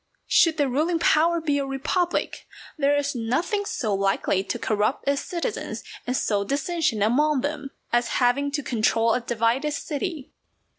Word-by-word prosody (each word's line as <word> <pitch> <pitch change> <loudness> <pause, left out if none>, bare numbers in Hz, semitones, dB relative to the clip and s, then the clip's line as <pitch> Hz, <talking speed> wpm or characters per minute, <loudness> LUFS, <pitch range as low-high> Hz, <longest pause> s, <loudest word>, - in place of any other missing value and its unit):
Should 330 -3 +4
the 290 -2 +2
ruling 310 +7 +1
power 330 +1 +3
be 295 -3 0
a 280 - -1
republic, 335 +6 -1 0.3
there 290 -1 +2
is 285 0 -1
nothing 265 - -1
so 225 - -2
likely 195 -1 +1
to 195 - -3
corrupt 215 +6 -1
its 280 0 +1
citizens 360 +6 -4 0.2
and 250 +1 0
sow 205 -2 0
dissension 285 - 0
among 280 +5 +2
them, 285 0 -3 0.2
as 240 0 +3
having 265 +3 +2
to 290 -1 -1
control 225 -1 +2
a 250 - 0
divided 235 +5 0
city. 300 0 -4
280 Hz, 155 wpm, -24 LUFS, 235-310 Hz, 0.3 s, Should